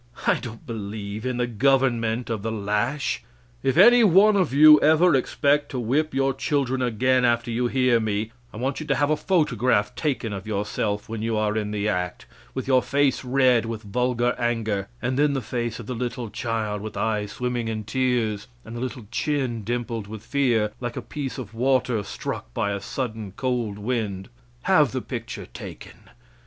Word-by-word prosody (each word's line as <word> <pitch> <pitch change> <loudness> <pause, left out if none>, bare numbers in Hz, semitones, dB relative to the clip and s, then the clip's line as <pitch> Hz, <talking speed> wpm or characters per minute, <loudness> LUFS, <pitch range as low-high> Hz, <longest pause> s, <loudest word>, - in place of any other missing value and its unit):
I - - +3
don't 120 +4 -9
believe 105 -1 -5
in 125 -1 -2
the 125 - +1
government 120 -1 +1
of 110 -3 -2
the 115 +2 -2
lash. 105 +7 -1 0.4
If 135 - 0
any 240 +5 +8
one 205 +2 +6
of 185 -8 +2
you 150 +2 +8
ever 160 +3 +5
expect 145 +2 +2
to 130 - -3
whip 140 +7 0
your 135 0 +2
children 135 -1 0
again 125 +2 +2
after 120 -1 +1
you 120 +2 0
hear 125 -2 +3
me, 110 0 -2 0.2
I - - -10
want 130 +4 -2
you 155 - -6
to - - +2
have 145 +1 +1
a - - +4
photograph 125 - +1
taken 125 -4 -2
of 95 +1 -6
yourself 105 0 -2
when 115 -1 -5
you 115 0 -1
are 105 0 0
in 105 -1 -1
the 105 0 -1
act, 90 -3 -2 0.3
with 130 - -3
your 130 -1 +4
face 140 -1 +1
red 125 -3 +3
with 115 -1 -5
vulgar 125 +3 0
anger; 110 -4 -1 0.2
and 130 +3 0
then 145 -1 +3
the 135 - 0
face 120 0 -3
of 115 - -7
the 125 - -4
little 120 -1 -4
child, 110 -2 -2
with 110 +1 -7
eyes 105 -2 -1
swimming 125 -2 -2
in 110 -1 -3
tears, 115 -3 0 0.2
and 110 - -8
the 120 - -5
little 125 -3 -5
chin 130 -5 -1
dimpled 115 -1 -3
with 110 0 -8
fear, 120 -5 +1
like 120 -1 -4
a - - -4
piece 140 -3 -5
of 115 -4 -7
water 125 -2 +1
struck 95 -10 -6
by 100 - 0
a 100 -1 -3
sudden, 110 -4 -4
cold 120 -5 -2
wind. 105 -3 -3 0.3
Have 150 - +4
the 130 - -1
picture 115 -3 -6
taken. - - -11
120 Hz, 190 wpm, -24 LUFS, 110-130 Hz, 0.4 s, any